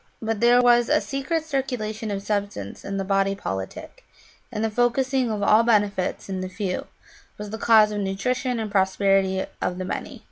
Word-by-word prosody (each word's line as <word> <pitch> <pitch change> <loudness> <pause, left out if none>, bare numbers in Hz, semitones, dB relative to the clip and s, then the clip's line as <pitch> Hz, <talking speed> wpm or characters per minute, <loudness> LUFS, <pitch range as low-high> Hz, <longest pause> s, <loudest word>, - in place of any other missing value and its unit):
But 225 -1 -2
there 245 +1 +5
was 240 -1 +4
a 305 +1 +4
secret 295 +4 -2
circulation 245 -7 -3
of 195 -1 -3
substance 200 - -3
in 195 0 -4
the 195 - -1
body 195 0 +1
politic, 95 - -6 0.5
and 215 - -3
the 220 - -1
focussing 250 +2 +1
of 210 -2 -2
all 215 +2 +5
benefits 205 -5 +1
in 190 -1 -4
the 185 - -4
few 185 -1 -3 0.5
was 210 -1 -7
the 220 - -5
cause 220 -2 +5
of 210 - -3
nutrition 245 +6 -1
and 215 -2 -4
prosperity 190 -1 +2 0.2
to - - +1
the 185 0 -4
many. - - -5
210 Hz, 180 wpm, -24 LUFS, 195-240 Hz, 0.5 s, there